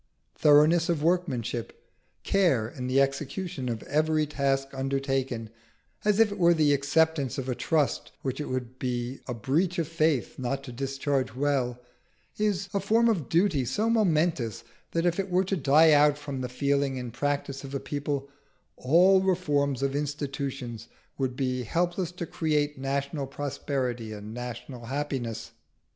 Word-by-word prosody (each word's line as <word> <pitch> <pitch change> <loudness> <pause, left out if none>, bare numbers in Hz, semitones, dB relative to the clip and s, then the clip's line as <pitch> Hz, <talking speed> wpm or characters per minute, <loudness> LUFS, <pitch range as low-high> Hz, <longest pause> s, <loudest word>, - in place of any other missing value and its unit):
Thoroughness 155 +3 +5
of 160 -4 0
workmanship, 130 -10 -1 0.4
care 170 - +2
in 125 0 -6
the 130 +2 +3
execution 140 +1 -1
of 115 -2 -4
every 155 +1 +1
task 135 -2 0
undertaken, 135 -4 -2 0.5
as 210 0 +2
if 225 -2 +5
it 205 - -6
were 170 -1 +5
the 150 -2 +4
acceptance 145 0 +1
of 135 -1 -3
a 130 - 0
trust 150 +3 0
which 135 +2 -2
it - - -5
would 130 0 -4
be 125 0 -3
a 125 - -3
breach 160 - 0
of 165 -3 0
faith 155 -6 0
not 135 +2 -2
to 125 - -8
discharge 135 0 -2
well, 130 -3 0 0.6
is 200 -2 0
a 200 - +1
form 225 +4 +3
of 175 - -1
duty 170 -5 +2
so 215 - 0
momentous 160 - +1 0.3
that 165 +1 -1
if 175 +1 +1
it 195 0 -1
were 180 +1 +3
to 195 - 0
die 155 0 +5
out 145 0 +5
from 140 -3 -5
the 125 - -3
feeling 140 +1 0
and 125 -2 -6
practice 140 0 -2
of 135 0 -6
a - - 0
people, 145 -1 -3 0.5
all 180 +8 +5
reforms 145 -8 +1
of 140 0 0
institutions 140 -5 -4 0.3
would 130 -2 -1
be 130 -1 -1
helpless 175 - -1
to 175 -1 -5
create 150 -3 0
national 140 +1 -2
prosperity 130 -5 -3
and 105 +1 -8
national 125 0 -7
happiness. 130 -4 -3
140 Hz, 155 wpm, -27 LUFS, 130-165 Hz, 0.6 s, Thoroughness